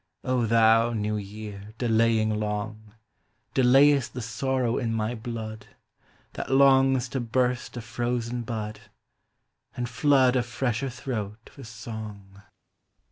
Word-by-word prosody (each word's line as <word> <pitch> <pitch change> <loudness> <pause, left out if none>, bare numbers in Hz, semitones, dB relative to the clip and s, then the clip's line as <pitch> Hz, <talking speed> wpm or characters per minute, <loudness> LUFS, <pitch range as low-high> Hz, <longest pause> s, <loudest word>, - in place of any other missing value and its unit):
O 125 -3 +1
thou, 115 +1 +4
new 105 -1 -1
year, 105 0 -8
delaying 110 -2 +2
long, 105 0 -4 0.6
Delayest 135 +1 +4
the 125 - -3
sorrow 120 +1 -1
in 115 -3 -1
my 110 +1 -1
blood. 110 -2 -6 0.7
That - - -5
longs 135 -1 +4
to 135 - -2
burst 125 +1 -1
a - - -4
frozen 120 +1 -2
bud, 110 -2 -5 1.0
And 120 0 -2
Hood 130 +1 +3
a 125 - +3
fresher 120 +2 -2
throat 115 -4 -6
with 135 -5 -10
song. 110 -4 -9
115 Hz, 120 wpm, -26 LUFS, 110-125 Hz, 1.0 s, thou